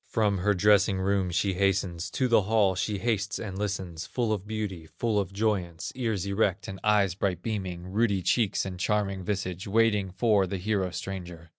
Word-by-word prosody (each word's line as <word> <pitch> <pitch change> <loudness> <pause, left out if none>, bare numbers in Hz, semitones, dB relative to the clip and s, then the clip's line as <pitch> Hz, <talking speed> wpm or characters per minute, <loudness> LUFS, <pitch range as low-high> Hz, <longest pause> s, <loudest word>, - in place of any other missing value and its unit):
From 105 -4 +1
her 105 +2 +2
dressing 100 0 +4
room 95 -1 +1
she 95 +3 +1
hastens, 95 -3 0
To 130 - 0
the 115 -3 +5
hall 100 -1 +3
she 100 +3 -1
hastes 105 -1 -1
and 100 -4 -5
listens, 95 -5 -3
Full 115 -3 0
of 100 -1 -4
beauty, 105 -7 -4
full 110 -3 +1
of 95 -2 -2
joyance, 95 -5 -1
Ears 110 -7 -2
erect 100 -1 0
and 95 0 -6
eyes 105 -3 +3
bright 90 -2 -2
beaming, 95 -6 -3
Ruddy 100 0 +1
cheeks 105 -2 +1
and 90 -2 -6
charming 100 -1 0
visage, 95 -2 -3
Waiting 105 -2 +2
for 100 0 +2
the 95 - -3
hero 95 0 0
stranger. 90 -2 -7
100 Hz, 180 wpm, -28 LUFS, 95-105 Hz, -, the